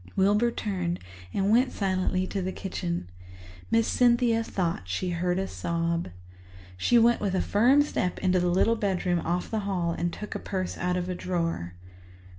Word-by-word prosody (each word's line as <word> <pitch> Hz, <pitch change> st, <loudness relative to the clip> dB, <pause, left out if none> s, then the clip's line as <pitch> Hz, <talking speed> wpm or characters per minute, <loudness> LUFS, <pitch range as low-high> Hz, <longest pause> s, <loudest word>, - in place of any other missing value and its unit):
Wilbur 205 Hz, +5 st, +3 dB
turned 180 Hz, -6 st, -2 dB, 0.3 s
and 195 Hz, -, +1 dB
went 250 Hz, +4 st, +4 dB
silently 185 Hz, -1 st, 0 dB
to 195 Hz, +1 st, -3 dB
the 185 Hz, +1 st, -2 dB
kitchen. 175 Hz, -, -4 dB, 0.6 s
Miss 230 Hz, 0 st, +3 dB
Cynthia 235 Hz, -2 st, +3 dB
thought 170 Hz, -, -2 dB
she 180 Hz, -, -2 dB
heard 180 Hz, +1 st, 0 dB
a 190 Hz, 0 st, -1 dB
sob. 170 Hz, -1 st, -2 dB, 0.7 s
She 95 Hz, -, +3 dB
went 235 Hz, +1 st, +4 dB
with 195 Hz, -2 st, 0 dB
a -, -, +2 dB
firm 255 Hz, +8 st, +4 dB
step 180 Hz, -10 st, -2 dB
into 185 Hz, -1 st, +2 dB
the 180 Hz, 0 st, +1 dB
little 190 Hz, +6 st, +3 dB
bedroom 185 Hz, -5 st, 0 dB
off 175 Hz, +2 st, -2 dB
the 220 Hz, -, 0 dB
hall 190 Hz, -4 st, -1 dB
and 170 Hz, +1 st, -2 dB
took 210 Hz, +4 st, -7 dB
a -, -, -4 dB
purse 185 Hz, -2 st, -3 dB
out 180 Hz, 0 st, -1 dB
of 180 Hz, 0 st, -2 dB
a 185 Hz, -, -2 dB
drawer. 165 Hz, -, -2 dB
185 Hz, 175 wpm, -27 LUFS, 175-210 Hz, 0.7 s, went